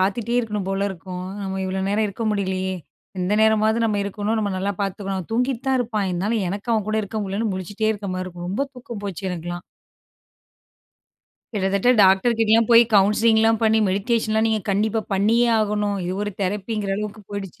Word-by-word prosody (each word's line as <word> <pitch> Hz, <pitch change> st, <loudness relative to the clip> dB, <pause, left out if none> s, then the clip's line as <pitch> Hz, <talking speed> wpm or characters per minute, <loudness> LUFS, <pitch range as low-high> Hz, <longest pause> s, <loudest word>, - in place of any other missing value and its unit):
பாத்துட்டே 215 Hz, +5 st, 0 dB
இருக்கணும் 210 Hz, -4 st, -3 dB
போல 195 Hz, 0 st, -1 dB
இருக்கும். 180 Hz, 0 st, -7 dB, 0.2 s
நம்ம 190 Hz, 0 st, -3 dB
இவ்வளோ 190 Hz, 0 st, -2 dB
நேரம் 210 Hz, +2 st, +1 dB
இருக்க 205 Hz, +3 st, -5 dB
முடிலையே, 190 Hz, -2 st, -1 dB, 0.5 s
இந்த 180 Hz, +2 st, 0 dB
நேரமாவது 220 Hz, 0 st, +3 dB
நம்ம 210 Hz, -2 st, 0 dB
இருக்கணும். 205 Hz, +2 st, -2 dB
நம்ம 205 Hz, -2 st, -1 dB
நல்லா 200 Hz, +2 st, -1 dB
பாத்துக்கணும். 195 Hz, -2 st, -3 dB
தூங்கிட்டு 250 Hz, +2 st, 0 dB
தான் 265 Hz, -1 st, +3 dB
இருப்பான். 220 Hz, -4 st, -1 dB
இருந்தாலும் 200 Hz, +4 st, -1 dB
எனக்கு 205 Hz, +5 st, -4 dB
அவன் 215 Hz, -3 st, 0 dB
கூட 215 Hz, 0 st, +1 dB
இருக்க 210 Hz, +2 st, -5 dB
முடிலன்னு 200 Hz, +2 st, -2 dB
முழிச்சிட்டே 205 Hz, +4 st, -2 dB
இருக்க 205 Hz, -2 st, -6 dB
மாரி 185 Hz, 0 st, -3 dB
இருக்கும். 175 Hz, -1 st, -7 dB
ரொம்ப 205 Hz, +10 st, -1 dB
தூக்கம் 235 Hz, -4 st, -8 dB
போச்சு 190 Hz, -1 st, -4 dB
எனக்கெல்லாம். 175 Hz, 0 st, -5 dB, 1.9 s
கிட்டத்தட்ட 200 Hz, +2 st, +1 dB
டாக்டர் 195 Hz, +5 st, +4 dB
கிட்டலாம் 225 Hz, 0 st, +4 dB
போய், 230 Hz, 0 st, +9 dB
கவுன்சிலிங்லாம் 220 Hz, +2 st, +4 dB
பண்ணி 220 Hz, 0 st, +4 dB
மெடிடேஷன் 215 Hz, +3 st, 0 dB
லாம் 220 Hz, +1 st, +3 dB
நீங்க 220 Hz, -1 st, +1 dB
கண்டிப்பா 215 Hz, +3 st, +1 dB
பண்ணியே 225 Hz, +5 st, +3 dB
ஆகணும். 210 Hz, -1 st, 0 dB
இது 180 Hz, -, -2 dB
ஒரு 205 Hz, -, -2 dB
தெரப்பிங்கிற 200 Hz, +1 st, -2 dB
அளவுக்கு 210 Hz, 0 st, -5 dB
போயிடுச்சு. 200 Hz, -3 st, -6 dB
205 Hz, 170 wpm, -22 LUFS, 190-220 Hz, 1.9 s, போய்